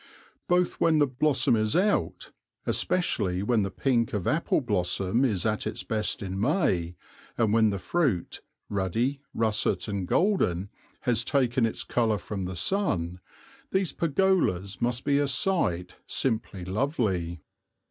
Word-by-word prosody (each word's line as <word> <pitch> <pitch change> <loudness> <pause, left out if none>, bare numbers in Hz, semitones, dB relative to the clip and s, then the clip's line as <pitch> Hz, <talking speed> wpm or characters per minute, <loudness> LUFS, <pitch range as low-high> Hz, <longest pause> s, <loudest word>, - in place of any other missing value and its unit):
Both 180 0 +1
when 160 -2 +4
the 150 - +5
blossom 130 -1 +2
is 110 +2 0
out, 205 +4 0 0.3
especially 95 - 0
when 115 0 +2
the 95 - -1
pink 120 0 0
of 100 -4 -2
apple 155 +2 +1
blossom 100 -1 0
is 110 -8 0
at 110 -1 0
its 110 +2 -4
best 110 -2 -2
in 95 0 -4
May, 100 - +1 0.4
and 110 -3 +2
when 110 -1 +4
the 100 - -2
fruit, 125 - -1 0.3
ruddy, 115 +8 -1
russet 110 -4 +1
and 100 -3 -3
golden, 100 - +1 0.3
has 120 -2 +1
taken 125 -4 +2
its - - -5
colour 115 -3 +1
from 100 -2 -5
the 95 +1 -5
sun, 90 - 0 0.5
these 190 -2 0
pergolas 155 - +1
must 120 +1 0
be 140 0 +3
a 145 - +1
sight 130 - 0
simply 110 -7 -1
lovely. 95 - -1
115 Hz, 140 wpm, -27 LUFS, 95-140 Hz, 0.5 s, the